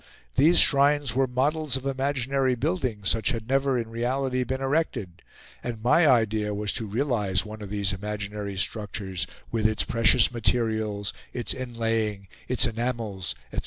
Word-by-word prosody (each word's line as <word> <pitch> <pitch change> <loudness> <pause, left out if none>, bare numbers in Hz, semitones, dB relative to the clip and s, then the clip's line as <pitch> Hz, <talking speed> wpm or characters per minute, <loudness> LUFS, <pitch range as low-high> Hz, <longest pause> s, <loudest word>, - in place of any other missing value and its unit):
These 165 - +5
shrines 140 -2 +5
were 135 +1 +2
models 140 +3 0
of 130 0 -4
imaginary 135 -1 0
buildings, 125 - -2
such 110 -1 +1
as - - 0
had 115 -1 -5
never 135 0 +2
in 115 -2 -2
reality 130 +2 -1
been 130 +2 -3
erected; 135 - -1 0.4
and 115 -3 -5
my 155 +7 +5
idea 110 -4 +2
was 105 -1 -2
to 115 -2 -3
realise 105 -5 0
one 110 0 -8
of 105 - -7
these 100 -1 +1
imaginary 105 0 -5
structures 100 -3 -3 0.2
with 110 -2 +2
its 110 -1 +1
precious 115 0 +3
materials, 110 -3 -1 0.2
its 120 -2 0
inlaying, 115 -5 -2 0.2
its 125 0 +3
enamels, 115 - -3 0.2
etc. - - -1
115 Hz, 155 wpm, -26 LUFS, 105-130 Hz, 0.4 s, These